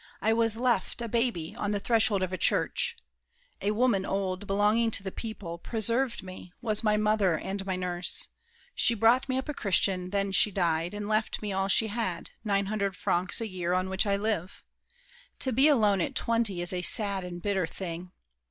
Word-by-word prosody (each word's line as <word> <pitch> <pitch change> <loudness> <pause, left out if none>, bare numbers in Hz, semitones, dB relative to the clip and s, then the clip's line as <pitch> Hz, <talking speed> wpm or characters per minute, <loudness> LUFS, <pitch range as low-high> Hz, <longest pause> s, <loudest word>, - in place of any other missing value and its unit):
I 220 - +2
was 225 -1 +1
left, 240 -4 0
A 235 - -3
baby, 230 -8 -1
on 205 0 -2
the 205 - 0
threshold 220 -3 +2
of 185 0 -3
a - - -1
church. - - +1 0.7
A 200 - 0
woman, 215 -2 +2
old, 195 0 -2
belonging 210 +4 +2
to 200 - 0
the 190 - -4
people, 190 -7 -7
Preserved 235 +3 -1
me, 185 -1 -10
was 215 -2 0
my 210 -1 +3
mother 210 -5 +2
and 195 +4 -4
my 190 - 0
nurse. 180 0 -1 0.4
She 235 - +3
brought 230 +5 +3
me 260 - 0
up 265 - -3
a 300 - -3
Christian, 185 -4 +1
then 200 0 -1
she 205 - +5
died 175 -2 -1
And 205 0 -4
left 215 0 -1
me 205 -2 -2
all 195 0 0
she 210 +3 +4
had—nine 200 -1 -2
hundred 200 -1 -2
francs 175 +5 0
A 225 - -2
year, 180 -3 -2
on 185 +1 0
which 190 +2 +1
I 200 - +2
live. 200 -3 -3 0.7
To 260 - -1
be 265 +5 +5
alone 210 -10 +3
At - - -2
twenty 225 -6 0
is 175 - +2
a 180 - -1
sad 200 0 +3
and 175 -1 -6
bitter 190 -2 -1
thing! 175 0 -7
200 Hz, 195 wpm, -28 LUFS, 185-225 Hz, 0.7 s, she